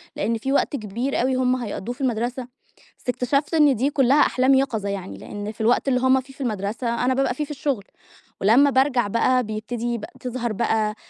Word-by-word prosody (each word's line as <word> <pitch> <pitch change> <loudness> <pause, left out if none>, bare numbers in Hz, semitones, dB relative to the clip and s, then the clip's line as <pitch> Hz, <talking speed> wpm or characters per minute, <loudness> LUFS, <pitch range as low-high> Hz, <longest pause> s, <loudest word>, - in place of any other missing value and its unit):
لأن 225 +3 -1
فيه 265 +5 -3
وقت 285 - +1
كبير 235 +3 -2
أوي 260 +1 +1
هم 255 0 +2
هيقضّوه 240 -1 -5
في - - -12
المدرسة، 245 0 -2 0.5
بس - - -9
اكتشفت 275 +6 0
إن 295 -4 +5
دي 260 +5 +1
كلّها 275 0 +3
أحلام 260 -1 +3
يقظة 240 -7 +1
يعني، 185 - -5
لأن 205 - -6
في 220 - -9
الوقت 240 +5 +2
اللي 250 -2 +2
هم 260 +1 +3
فيه 270 +1 -16
في 275 - -12
المدرسة، 230 +1 -2
أنا 260 - +2
بابقى 270 -1 +1
فيه 300 +4 -3
في 295 - -10
الشغل، 275 -6 -2 0.6
ولمّا 245 +8 +5
بارجع 260 -4 +2
بقى 250 +4 +2
بيبتدي 225 +2 -3
بق 210 - -7
تظهر 245 -2 -3
بقى 215 -1 0
250 Hz, 200 wpm, -23 LUFS, 220-265 Hz, 0.6 s, إن